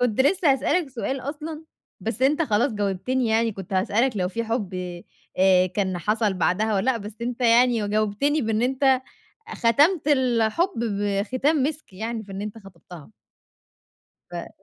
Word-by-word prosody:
كنت 245 -2 +1
لسه 310 +2 +4
هاسألك 295 +4 0
سؤال 265 +2 -3
أصلًا، 305 +4 -6 0.4
بس 225 +5 -4
أنت 295 +5 +3
خلاص 235 0 +1
جاوبتني 210 +5 -1
يعني، 225 0 +1
كنت 195 -1 -9
هاسألك 215 +6 +1
لو 180 -2 0
في 230 +4 -3
حب، 220 -5 -3 0.6
آآ، 185 -1 +5
كان 185 0 -2
حصل 210 +2 0
بعدها 195 +4 +1
والَّا 200 +6 +2
لأ، 255 - 0
بس 210 -1 -8
أنت 245 +1 -4
يعني 240 -1 +4
و - - -2
جاوبتني 215 +8 0
بإن 220 0 0
أنت 265 +1 +2 0.5
ختمت 290 +8 +2
الحب 260 - +2
بختام 210 +8 0
مِسك 300 -4 -3
يعني، 225 +3 -4
بإن 195 -1 -8
أنت 210 +1 -6
خطبتها. 175 - -14 1.2
ف - - -6
230 Hz, 150 wpm, -24 LUFS, 205-265 Hz, 1.2 s, آآ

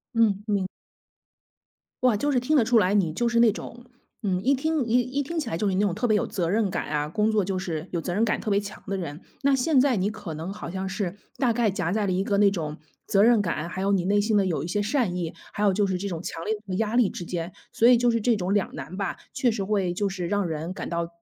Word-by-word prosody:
嗯， 210 -3 +3
明 200 -3 +1 1.4
哇， 240 -5 +4
就 290 +5 0
是 250 - +3
听 295 +5 +2
得 235 - +4
出 240 0 +4
来， 195 -1 +2
你 180 -6 +2
就 235 +7 0
是 235 0 +2
那 235 - +6
种， 240 +3 -9 0.4
嗯， 185 -2 0
一 275 +3 +4
听 300 -1 0
一 235 +2 +3
一 255 +3 -1
听 335 +3 -3
起 265 - -3
来 165 - -2
就 205 +2 0
是 190 - 0
那 190 - +1
种 200 -4 +1
特 240 - -1
别 215 -3 +3
有 - - -1
责 175 -3 -2
任 210 +1 +2
感 - - -2
啊， 150 0 -1
工 210 +7 +1
作 210 -4 +2
就 190 -1 -2
是 170 -2 -4
有 170 - 0
责 175 - -3
任 215 +5 +2
感 215 - 0
特 215 - -2
别 200 - +3
强 205 0 -8
的 195 - -2
人。 165 -3 -6 0.2
那 275 0 +4
现 265 +1 +3
在 260 -2 +4
你 195 +1 +1
可 205 -6 -7
能 160 +5 -5
好 200 - -7
像 190 +2 -3
是 195 -1 -3 0.2
大 245 -3 +2
概 225 -3 +2
夹 180 -2 -1
在 215 -1 +1
了 190 - 0
一 185 +1 +1
个 200 0 0
那 200 -1 +5
种 155 -5 -4 0.3
责 200 +1 +4
任 230 -2 +5
感， 170 -3 -2
还 190 - -5
有 200 +1 +2
你 185 - +2
内 200 +3 +2
心 215 +1 +1
的 200 -2 +4
有 165 -3 -1
一 - - -5
些 205 +3 0
善 215 -4 0
意， 170 -3 -3 0.2
还 205 - -2
有 200 - +5
就 205 0 +2
是 185 - -1
这 200 +2 -4
种 165 -2 -4
强 165 -2 -5
烈 220 - 0
的 185 - -2
压 225 +3 0
力 235 -6 +4
之 175 - -6
间。 170 0 -4 0.2
所 230 - +4
以 250 - +8
就 240 0 +3
是 230 - +1
这 230 +1 +2
种 190 0 -1
两 205 -2 0
难 155 +5 -7
吧， 200 - -2 0.2
确 250 - +2
实 215 -3 -1
会 190 -3 0
就 200 +2 -1
是 185 -3 -4
让 205 +1 0
人 165 +2 -3
感 - - -6
到 170 0 -1
200 Hz, 310 characters per minute, -25 LUFS, 180-230 Hz, 1.4 s, 以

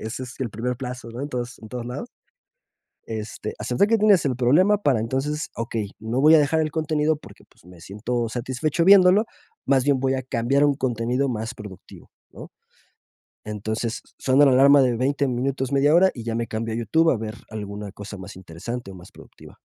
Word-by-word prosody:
ese 110 +4 -5
es 125 0 -10
el 125 -3 -2
primer 120 +4 -3
plazo, 125 -1 -7
¿no?, 120 - -7
en 145 - -4
tos 125 -1 -5
en 110 - -12
todo 120 +2 -5
lados 125 - -6 1.0
este, 110 -1 -5
aceptar 125 +12 +1
que 225 - +4
tienes 205 -4 +4
el 130 -3 -1
problema 150 +12 +4
para 130 - +2
entonces, 135 +7 -2
okey, 115 -3 -4
no 115 +4 -2
voy 155 +3 +7
a - - +8
dejar 155 +2 +2
el 155 - -1
contenido 155 0 0
porque, 150 - -16
pues, - - -27
me 90 -1 -15
siento 115 +6 -3
satisfecho 130 +7 -1
viéndolo, 195 +2 +6 0.4
más 135 -2 +3
bien 140 -2 +2
voy 135 0 0
a 130 - -1
cambiar 130 +2 0
un 145 - +2
contenido 125 +1 -1
más 115 +1 -4
productivo, 100 -3 -12 0.2
¿no? - - -11 1.0
Entonces, 110 +2 -4 0.2
suena 135 +2 +4
la 135 - +5
alarma 140 +2 +6
de 125 -2 +2
20 140 +3 0
minutos, 130 +1 -2
media 140 +2 +3
hora, 185 +3 +6
y 120 - -9
ya 115 0 -3
me 115 0 -2
cambio 110 +1 -4
a - - -3
YouTube 160 +9 +2
a - - 0
ver 110 0 -6 0.2
alguna 105 -1 -6
cosa 100 0 -9
más 95 -1 -10
interesante 95 +6 -7
o 95 - -10
más 90 -1 -14
productiva. - - -16
125 Hz, 200 wpm, -23 LUFS, 110-145 Hz, 1.0 s, a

